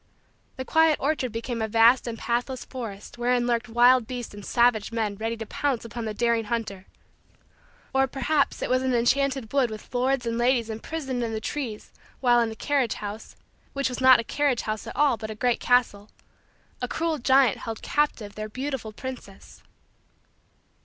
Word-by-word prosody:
The 260 Hz, -, -5 dB
quiet 320 Hz, 0 st, +4 dB
orchard 275 Hz, -4 st, -1 dB
became 230 Hz, +1 st, -4 dB
a 220 Hz, -, 0 dB
vast 230 Hz, +3 st, +4 dB
and 230 Hz, -1 st, -4 dB
pathless 245 Hz, +3 st, -2 dB
forest 230 Hz, -3 st, -8 dB
wherein 245 Hz, 0 st, +1 dB
lurked 240 Hz, 0 st, 0 dB
wild 240 Hz, 0 st, +5 dB
beasts 245 Hz, -3 st, -6 dB
and 205 Hz, 0 st, -10 dB
savage 235 Hz, -1 st, +2 dB
men 220 Hz, -3 st, -1 dB
ready 225 Hz, +2 st, -3 dB
to 225 Hz, -, -6 dB
pounce 265 Hz, 0 st, -2 dB
upon 230 Hz, 0 st, -6 dB
the 215 Hz, -, -3 dB
daring 235 Hz, 0 st, +1 dB
hunter; 205 Hz, -4 st, -4 dB, 1.1 s
or, 270 Hz, 0 st, +3 dB
perhaps, 275 Hz, +4 st, 0 dB
it -, -, -2 dB
was 255 Hz, 0 st, +3 dB
an 260 Hz, -1 st, 0 dB
enchanted 265 Hz, 0 st, +1 dB
wood 270 Hz, -4 st, +3 dB
with 215 Hz, +2 st, -10 dB
lords 255 Hz, 0 st, +1 dB
and 230 Hz, 0 st, -2 dB
ladies 240 Hz, -2 st, +2 dB
imprisoned 260 Hz, +2 st, -4 dB
in 225 Hz, -1 st, -3 dB
the 220 Hz, -, -2 dB
trees 230 Hz, -3 st, -5 dB, 0.3 s
while 245 Hz, -2 st, +4 dB
in 230 Hz, -1 st, +1 dB
the 220 Hz, -, -7 dB
carriage 270 Hz, -2 st, 0 dB
house 210 Hz, +1 st, -7 dB, 0.4 s
which 275 Hz, -1 st, 0 dB
was 250 Hz, 0 st, -5 dB
not 260 Hz, -1 st, +8 dB
a -, -, -1 dB
carriage 280 Hz, 0 st, 0 dB
house 215 Hz, -1 st, -4 dB
at -, -, -7 dB
all 280 Hz, -4 st, +3 dB
but 220 Hz, -1 st, -6 dB
a 215 Hz, -, -5 dB
great 245 Hz, +2 st, +1 dB
castle 225 Hz, -4 st, +1 dB, 0.7 s
a -, -, -1 dB
cruel 325 Hz, -2 st, -1 dB
giant 260 Hz, -2 st, +4 dB
held 225 Hz, -1 st, -6 dB
captive 245 Hz, -9 st, -1 dB
their 215 Hz, 0 st, -6 dB
beautiful 260 Hz, -1 st, -4 dB
princess. 235 Hz, -4 st, -9 dB
240 Hz, 180 wpm, -25 LUFS, 225-260 Hz, 1.1 s, not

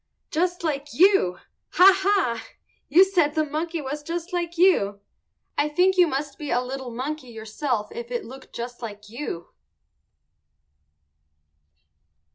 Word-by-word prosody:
_ -, -, -52 dB
Just 350 Hz, +2 st, 0 dB
like 290 Hz, -3 st, -2 dB
you! 355 Hz, -, +4 dB, 0.4 s
Ha, 380 Hz, +2 st, +8 dB
ha! 385 Hz, -, +1 dB, 0.5 s
You 345 Hz, +6 st, +7 dB
said 340 Hz, -6 st, +1 dB
the 310 Hz, -1 st, +2 dB
monkey 320 Hz, +3 st, -3 dB
was 290 Hz, +2 st, -5 dB
just 340 Hz, +4 st, -5 dB
like 345 Hz, -1 st, -2 dB
you; 265 Hz, -, +3 dB, 0.6 s
I 295 Hz, +1 st, +2 dB
think 360 Hz, +5 st, +3 dB
you 360 Hz, -2 st, +5 dB
must 285 Hz, +2 st, -4 dB
be 295 Hz, -2 st, -5 dB
a 245 Hz, -, +2 dB
little 260 Hz, 0 st, -5 dB
monkey 260 Hz, +4 st, -5 dB
yourself 220 Hz, 0 st, -3 dB
if 235 Hz, 0 st, -7 dB
it 245 Hz, -1 st, -3 dB
looked 265 Hz, +3 st, -12 dB
just 240 Hz, +1 st, -7 dB
like 210 Hz, -2 st, -8 dB
you. 225 Hz, -8 st, -6 dB
295 Hz, 140 wpm, -24 LUFS, 240-345 Hz, 0.6 s, Ha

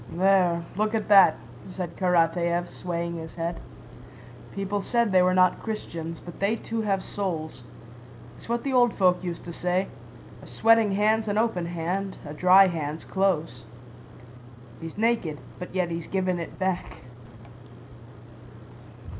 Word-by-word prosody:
"There, 180 Hz, -1 st, +3 dB
look 215 Hz, +2 st, 0 dB
at 215 Hz, -2 st, -2 dB
that," 195 Hz, -6 st, +7 dB, 0.3 s
said 180 Hz, -2 st, -6 dB
Karatáev, 175 Hz, -1 st, +1 dB
swaying 170 Hz, -1 st, -4 dB
his 160 Hz, 0 st, -8 dB
head. 165 Hz, 0 st, -3 dB, 0.9 s
"People 200 Hz, +1 st, -3 dB
said 235 Hz, 0 st, +1 dB
they 185 Hz, -1 st, +5 dB
were 185 Hz, 0 st, +3 dB
not 185 Hz, -1 st, +3 dB
Christians, 165 Hz, -7 st, -5 dB
but 175 Hz, -, -11 dB
they 200 Hz, +3 st, +1 dB
too 230 Hz, 0 st, -4 dB
have 195 Hz, -3 st, 0 dB
souls. 160 Hz, -, -4 dB, 0.7 s
It's -, -, -15 dB
what 235 Hz, 0 st, -1 dB
the 275 Hz, -, -2 dB
old 245 Hz, -2 st, +4 dB
folk 180 Hz, -2 st, +2 dB
used 175 Hz, -2 st, -5 dB
to 170 Hz, -, -7 dB
say: 180 Hz, +3 st, -1 dB, 0.5 s
'A -, -, -13 dB
sweating 225 Hz, -2 st, +3 dB
hand's 215 Hz, +2 st, +2 dB
an 205 Hz, 0 st, -1 dB
open 215 Hz, -7 st, 0 dB
hand, 180 Hz, +3 st, -3 dB
a 145 Hz, -, -7 dB
dry 185 Hz, +4 st, +6 dB
hand's 160 Hz, -3 st, -3 dB
close.' 165 Hz, -10 st, -1 dB, 1.1 s
He's 165 Hz, +2 st, -8 dB
naked, 220 Hz, -9 st, 0 dB, 0.2 s
but 180 Hz, 0 st, -8 dB
yet 180 Hz, -2 st, 0 dB
he's 165 Hz, -1 st, -5 dB
given 185 Hz, -2 st, -1 dB
it 170 Hz, -, -7 dB
back." 185 Hz, -1 st, -3 dB
185 Hz, 145 wpm, -26 LUFS, 170-205 Hz, 1.1 s, that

